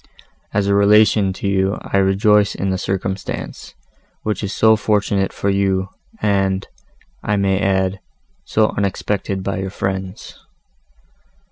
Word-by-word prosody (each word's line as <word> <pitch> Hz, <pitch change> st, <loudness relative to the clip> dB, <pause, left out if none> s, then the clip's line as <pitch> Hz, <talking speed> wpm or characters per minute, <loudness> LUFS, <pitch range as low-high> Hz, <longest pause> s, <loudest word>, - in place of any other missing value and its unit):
As 100 Hz, -1 st, 0 dB
a 100 Hz, -, +2 dB
relation 105 Hz, 0 st, +4 dB
to 100 Hz, -, -4 dB
you 95 Hz, +1 st, +1 dB
I -, -, -1 dB
rejoice 100 Hz, +1 st, +3 dB
in 95 Hz, 0 st, -1 dB
the 95 Hz, -, -1 dB
circumstance, 95 Hz, +1 st, -4 dB, 0.5 s
which 105 Hz, 0 st, -2 dB
is 100 Hz, -, -3 dB
so 110 Hz, +1 st, +4 dB
fortunate 105 Hz, -2 st, 0 dB
for 100 Hz, -, -1 dB
you, 95 Hz, -1 st, 0 dB, 0.3 s
and, 95 Hz, -1 st, +1 dB, 0.5 s
I 105 Hz, -, 0 dB
may 100 Hz, -1 st, +1 dB
add, 95 Hz, -1 st, 0 dB, 0.4 s
so 110 Hz, 0 st, +2 dB
unexpected 100 Hz, -1 st, -2 dB
by 100 Hz, 0 st, -2 dB
your 95 Hz, 0 st, -3 dB
friends." 95 Hz, 0 st, -5 dB
100 Hz, 130 wpm, -19 LUFS, 95-105 Hz, 0.5 s, relation